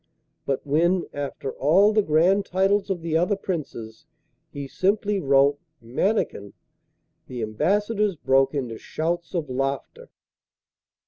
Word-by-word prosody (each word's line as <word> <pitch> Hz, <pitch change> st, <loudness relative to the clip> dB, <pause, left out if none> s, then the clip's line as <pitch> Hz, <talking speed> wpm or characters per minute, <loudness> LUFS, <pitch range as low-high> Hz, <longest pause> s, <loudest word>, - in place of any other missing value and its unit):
But 135 Hz, +1 st, -1 dB
when, 170 Hz, +5 st, +2 dB
after 140 Hz, -1 st, -4 dB
all 190 Hz, +10 st, +4 dB
the 215 Hz, -, +4 dB
grand 180 Hz, +4 st, +3 dB
titles 195 Hz, +2 st, +1 dB
of 180 Hz, -4 st, -2 dB
the 165 Hz, -1 st, -2 dB
other 180 Hz, +5 st, +2 dB
Princes, 140 Hz, -, -6 dB, 0.4 s
he 140 Hz, -1 st, -7 dB
simply 200 Hz, +5 st, 0 dB
wrote 140 Hz, -2 st, +3 dB, 0.2 s
'Mannikin,' 120 Hz, -, -1 dB, 0.7 s
the 125 Hz, -3 st, -5 dB
ambassadors 205 Hz, -, 0 dB
broke 135 Hz, -1 st, +2 dB
into 120 Hz, -5 st, -3 dB
shouts 170 Hz, +3 st, -3 dB
of 165 Hz, -4 st, -1 dB
laughter. 135 Hz, -, -4 dB
165 Hz, 120 wpm, -24 LUFS, 135-195 Hz, 0.7 s, all